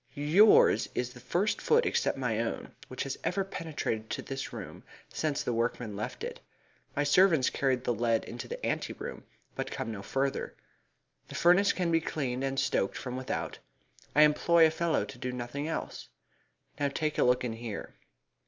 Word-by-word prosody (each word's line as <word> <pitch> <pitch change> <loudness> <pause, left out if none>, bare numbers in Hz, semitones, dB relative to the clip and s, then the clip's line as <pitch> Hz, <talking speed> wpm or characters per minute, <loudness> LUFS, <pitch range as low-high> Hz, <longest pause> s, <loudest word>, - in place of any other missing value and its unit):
"Yours 165 +10 +5
is 125 0 -2
the 125 - -12
first 175 - 0
foot 470 +1 +3
except 470 - +1
my - - -1
own - - -3
which - - -4
has - - -5
ever 195 +2 0
penetrated 150 - -4
to - - -3
this 135 0 -5
room - - -8 0.3
since 150 -3 -1
the 120 - -1
workmen 115 -2 -1
left 105 +1 -5
it. - - -5 0.6
My 145 - +2
servants 160 -2 +4
carry 135 -2 +2
the 125 -1 -2
lead 115 0 +1
into 120 - -7
the - - -5
ante - - -1
room, - - -7 0.3
but - - -4
come 115 - -4
no 100 -3 -6
further. 135 +6 -2 0.7
The - - -9
furnace 180 +4 +5
can 175 -2 -1
be 165 0 +3
cleaned 135 -5 -2
and 135 0 -1
stoked 130 -7 0
from 125 -1 -5
without. 130 0 -4 0.6
I 150 - +8
employ 165 +2 +5
a 160 - +4
fellow 165 0 0
to - - -10
do 125 0 -3
nothing 125 +4 -4
else. 165 - -5 0.7
Now 145 - +2
take 155 +2 -2
a - - +5
look 125 0 +3
in 120 -2 -2
here." 115 -2 -6
135 Hz, 180 wpm, -30 LUFS, 125-165 Hz, 0.7 s, I